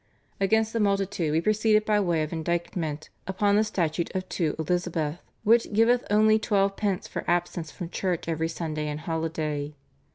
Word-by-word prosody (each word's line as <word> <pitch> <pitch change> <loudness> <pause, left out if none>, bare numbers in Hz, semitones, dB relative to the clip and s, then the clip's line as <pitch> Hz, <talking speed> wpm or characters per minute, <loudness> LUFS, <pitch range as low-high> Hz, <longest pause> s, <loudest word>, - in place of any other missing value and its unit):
Against 220 +3 +2
the 230 - 0
multitude 195 -5 +1
we 160 +2 +2
proceeded 215 +2 +3
by 210 -1 +3
way 170 -5 +1
of 155 - -5
indictment 165 -2 -2 0.2
upon 200 +2 +2
the 215 - +4
Statute 170 -6 -1
of 185 0 -2
2 160 -4 -1
Elizabeth, 165 -1 -1 0.2
which 230 +1 +4
giveth 235 +3 +3
only 215 +1 +5
twelve 200 -3 +1
pence 200 -3 -1
for - - -5
absence 175 -2 0
from 175 - -6
church 180 -4 -2
every 160 0 -1
Sunday 155 -2 -3
and 150 0 -4
holiday. 155 -2 -3
175 Hz, 165 wpm, -26 LUFS, 160-210 Hz, 0.2 s, only